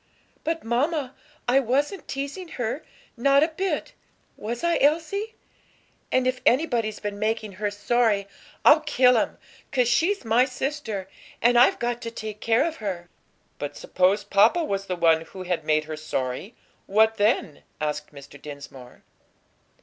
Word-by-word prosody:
But, 325 0 -2
mamma, 270 +3 0 0.3
I 255 +3 +5
wasn't 280 - -1
teasing 280 +7 -5
her, 245 +4 -2 0.3
not 275 +4 +4
a 320 - +2
bit; 375 +4 -3 0.4
was 235 +6 -5
I, 340 0 +2
Elsie? 335 +9 +1 0.8
And 255 0 +2
if 255 0 0
anybody's 240 -6 +1
been 205 -1 -5
making 215 0 -1
her 205 - +1
sorry, 205 -1 +1 0.4
I'll 305 - +8
kill 260 -5 +4
him. 225 - 0 0.3
'Cause 250 -3 +2
she's 330 - +1
my 225 +3 +4
sister, 255 -6 -3 0.3
and 240 +1 +4
I've 240 +2 +6
got 240 0 -2
to 230 - -4
take 215 -2 -7
care 230 +6 +2
of 330 -1 -3
her." 180 -5 -5 0.5
"But 145 - -5
suppose 190 +3 +1
papa 265 - +4
was 195 -8 -2
the 185 - -1
one 165 -2 +4
who 185 +3 -9
had 180 -3 -2
made 155 0 +2
her 155 0 -6
sorry; 155 - -4 0.3
what 220 +2 +3
then?" 205 - +1 0.2
asked 150 0 -3
Mr. 140 -1 -13
Dinsmore. 140 -4 -11
230 Hz, 150 wpm, -25 LUFS, 195-275 Hz, 0.8 s, I'll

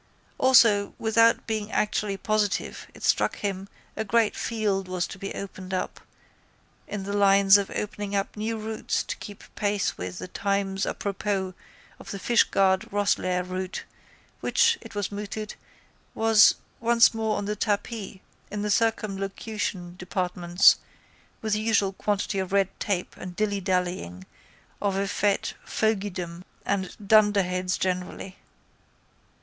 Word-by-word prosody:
Also, 230 -6 +5
without 230 +1 +3
being 220 -1 -3
actually 210 -1 0
positive, 215 -1 -1
it - - -12
struck - - +2
him 195 -1 -4 0.3
a 220 - -1
great 220 +1 +2
field 205 -4 -1
was 185 -1 -1
to 195 - -9
be 195 - -5
opened 190 -1 -6
up 185 - -3 0.9
in 205 -2 -4
the 200 +1 -4
line 200 -1 +4
of 200 -1 +3
opening 205 -1 -3
up 195 0 -1
new 220 +1 -2
routes 220 0 -2
to - - -4
keep 205 -1 -10
pace 205 -1 -1
with 90 0 -5
the - - -6
times 195 0 -1
apropos 195 -2 -2 0.5
of - - -11
the 200 - -4
Fishguard 195 -3 +3
Rosslare 185 -3 +1
route 185 0 -4 0.6
which, 460 0 +3
it - - -11
was 205 -1 -2
mooted, 210 +1 -5 0.6
was 225 -2 +6 0.2
once 235 0 +5
more 220 -1 -1
on 205 - -3
the 210 +1 -2
tapis 210 -1 -2 0.3
in 205 0 -4
the 210 - 0
circumlocution 195 -4 -1
departments 180 -1 +3 0.7
with 215 -1 0
the 210 - +1
usual 205 -3 +2
quantity 200 0 -1
of 190 -1 -3
red 195 -1 +3
tape 195 -4 -2
and 180 -1 -7
dillydallying 180 - -1 0.6
of 200 -2 0
effete 200 0 0
fogeydom 190 -5 -2 0.2
and 190 -2 -2
dunderheads 195 -4 +3
generally. 185 +1 -3
200 Hz, 135 wpm, -26 LUFS, 190-215 Hz, 0.9 s, was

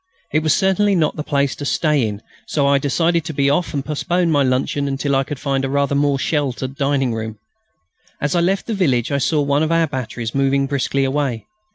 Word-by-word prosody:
It 155 - +3
was 155 0 +2
certainly 195 +1 +2
not 155 -4 +1
the 150 - -4
place 140 -3 0
to - - -6
stay 145 -3 +1
in, 105 +1 -6 0.2
so 145 -2 0
I 140 0 +4
decided 165 +4 +1
to 160 - -4
be 140 0 +2
off 170 +4 0
and 140 -3 -3
postpone 170 +3 0
my 145 -2 +3
luncheon 135 +2 0
until 140 0 -1
I 135 - +2
could 145 +1 -6
find 135 -1 -1
a 135 - -1
rather 140 0 +1
more 140 0 +2
sheltered 135 -2 -2
dining 140 -3 0
room. 110 -1 -5 0.8
As 145 - -1
I - - +3
left 190 +3 0
the 230 - -3
village 135 - +1
I 140 - +1
saw 150 +2 +1
one 140 +1 +1
of 160 +1 0
our 165 0 +3
batteries 125 -5 -5
moving 135 0 +2
briskly 140 0 0
away. 135 -4 -1
140 Hz, 220 wpm, -19 LUFS, 135-155 Hz, 0.8 s, I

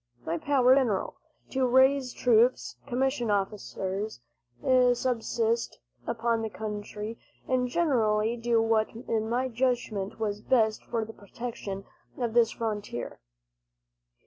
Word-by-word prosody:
My 165 +1 -1
powers 275 - +1
were 255 - +8
general 225 -8 0 0.4
to 260 -1 +1
raise 260 +1 +4
troops, 245 +1 +3
commission 260 -2 0
officers, 200 - -2 0.8
subsist 235 -2 -1 0.3
upon 230 0 0
the 220 - -2
country, 210 +1 -6 0.3
and 255 -1 +1
generally 230 -7 +2
to 235 - -11
do 230 -1 +3
what 225 -1 +2
in 225 -2 -2
my 250 +3 +1
judgment 235 -5 -1
was 210 -1 -2
best 220 -4 +2
for 225 -2 -2
the 225 - -10
protection 200 -2 -6 0.3
of 235 -3 -2
this 235 -1 +5
frontier. 210 - -4
230 Hz, 120 wpm, -28 LUFS, 215-250 Hz, 0.8 s, were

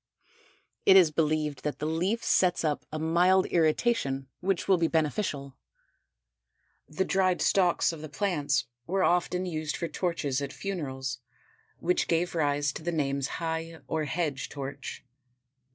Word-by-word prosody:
It 190 - +7
is 175 -5 +6
believed 155 -2 0
that 150 - -3
the 150 - -4
leaf 180 +9 0
sets 180 -2 +3
up 150 -2 -1
a 155 - -3
mild 175 +4 +3
irritation 155 - +1
which 190 -1 -1
will 190 -3 +4
be 165 - +3
beneficial. 150 -4 -1 1.3
The 175 +5 -1
dried 185 -2 +2
stalks 180 -3 +3
of 160 - -8
the 155 - -7
plants 150 -6 0 0.2
were 190 +2 +1
often 180 +1 +1
used 155 -4 -3
for 170 - -2
torches 160 -7 -1
at 140 - -4
funerals 135 -10 -4 0.6
which 180 +1 0
gave 170 +1 +1
rise 145 -3 +1
to - - -7
the 175 +2 -2
names 140 -4 0
High 165 0 -3
or 155 -1 -1
Hedge 145 -3 -2
Torch. 140 -2 -7
160 Hz, 145 wpm, -28 LUFS, 145-180 Hz, 1.3 s, It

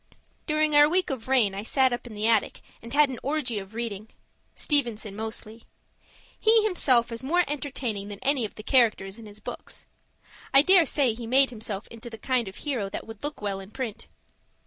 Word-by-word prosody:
During 305 0 +1
our 295 0 +7
week 360 -1 +1
of 255 -4 -5
rain 245 -7 +3
I 195 - -4
sat 260 +3 +2
up 240 0 -5
in 220 - -10
the 210 +1 -2
attic 225 -2 +1 0.2
and 230 - -11
had 290 0 +4
an 255 - -6
orgy 270 -6 -2
of 195 +2 -11
reading 220 -2 -4 0.5
Stevenson, 235 -8 0
mostly. 220 +1 -6 0.8
He 440 0 +4
himself 255 - +3
is 230 0 -5
more 340 +7 +2
entertaining 260 -8 -4
than 205 -1 -7
any 275 -2 +2
of 215 - -5
the 215 - -10
characters 225 -5 +2
in 225 - -11
his 210 0 -12
books; - - -8 0.7
I 275 - +9
dare 365 -2 +6
say 265 -5 +1
he 230 0 -8
made 265 +2 +4
himself 215 -3 -5
into 230 +1 -9
the 225 - -9
kind 250 -2 -1
of 190 - -8
hero 245 -10 -3
that - - -6
would 225 +1 -11
look 295 -6 -5
well 200 -1 -2
in 190 0 -11
print. 230 -2 -6
235 Hz, 200 wpm, -26 LUFS, 215-280 Hz, 0.8 s, I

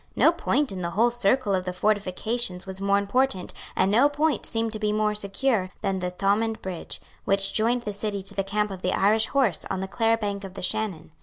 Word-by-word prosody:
No - - +5
point 290 -6 0
in 185 -1 -5
the 170 - -2
whole 225 +7 +2
circle 240 -1 +1
of 185 -1 +1
the 180 0 -4
fortifications 205 +1 -1
was 190 0 -5
more 200 0 +3
important, 200 0 +1 0.2
and 190 +1 +2
no 250 +7 +5
point 300 +2 0
seemed 225 -1 -1
to 215 - -5
be 210 -1 0
more 210 0 +1
secure, 210 0 0
than 195 -2 -1
the 180 0 -2
Thomond 205 +4 0
Bridge, 185 -3 -5 0.2
which 195 0 0
joined 235 +2 +2
the 210 - -3
city 200 -1 -3
to 195 - -4
the 195 0 -1
camp 210 +1 -1
of 190 -1 -7
the 180 - 0
Irish 215 +3 +3
horse 260 -9 +2
on - - -2
the 190 - -3
Clare 225 +3 +2
bank 205 -2 -3
of 190 -1 -8
the - - -6
Shannon. 180 -6 -2
205 Hz, 225 wpm, -25 LUFS, 190-225 Hz, 0.2 s, No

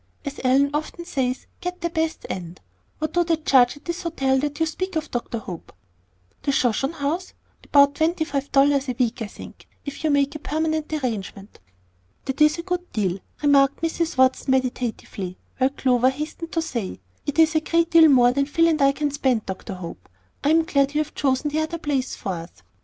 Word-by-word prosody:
As 280 0 -5
Ellen 270 +2 +3
often 310 +3 -4
says, 260 -6 -2
get 360 0 -5
the 340 -1 -1
best 320 -1 -2
and 175 -1 -6 0.4
What 310 0 -3
do 350 - +3
they 335 -1 +2
charge 270 -4 +3
at 290 - -19
this 345 +1 -3
hotel 270 -6 +1
that 290 +2 -3
you 325 - +3
speak 370 +4 -4
of, 315 -1 -2
Dr. 240 -1 -3
Hope?" 185 -6 -8 0.7
"The 280 - 0
Shoshone 270 +3 +1
House? 320 +5 -3 0.3
About 280 -1 +5
twenty 320 +2 +1
five 280 -1 -3
dollars 275 0 +3
a 250 - -2
week, 245 -2 0
I 220 - -2
think, - - -12 0.2
if 285 +2 -7
you 315 - +2
make 285 -1 +2
a 305 - -6
permanent 315 +1 -2
arrangement." 215 -8 -4 0.7
"That 270 +2 -3
is 300 +1 +5
a 335 - -5
good 360 0 -3
deal," 195 -4 -1 0.2
remarked 280 0 +4
Mrs. 330 -2 -1
Watson, 260 +1 +3
meditatively, 245 -7 -2 0.2
while 260 0 +4
Clover 255 -2 +2
hastened 305 +4 -6
to 330 - +1
say, 235 - -4 0.3
"It 290 - -2
is 320 -1 +5
a 315 - +3
great 335 +1 +1
deal 330 -2 +8
more 245 -3 +6
than 275 +2 0
Phil 330 +3 +3
and 315 -2 +1
I 275 0 +5
can 295 0 -1
spend, 260 -6 0
Dr. 190 +1 -6
Hope; 170 - -9 0.3
I 285 - +2
am 325 +1 +5
glad 280 -2 +1
you 305 - +3
have 305 - -5
chosen 280 +1 0
the 310 - 0
other 315 +2 -2
place 280 -5 -2
for 195 - -4
us." 165 0 -7
285 Hz, 200 wpm, -23 LUFS, 255-315 Hz, 0.7 s, deal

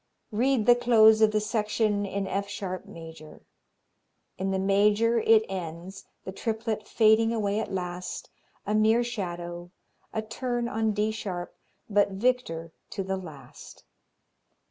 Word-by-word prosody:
Read 240 +1 +1
the 245 - +8
close 220 -3 +5
of 220 - +6
the 215 - +2
section 210 -1 0
in 195 0 -3
F 200 +1 -3
sharp 190 -3 -5
major. 160 -2 -12 0.9
In 190 +1 -2
the 190 - 0
major 205 +4 +3
it 220 0 +4
ends, 180 +1 -7 0.2
the 190 - -5
triplet 220 +1 -3
fading 225 0 +4
away 210 -2 0
at 220 - -4
last, 180 -1 -5 0.3
a 210 - -1
mere 220 +2 +4
shadow, 175 -6 -5 0.4
a 220 - -3
turn 240 +2 -3
on 225 -3 0
D 210 +1 0
sharp, 185 -5 -5 0.3
but 205 -1 +2
victor 190 -8 -1 0.2
to 195 - -4
the 190 0 -2
last. 150 -9 -12
210 Hz, 140 wpm, -27 LUFS, 190-220 Hz, 0.9 s, the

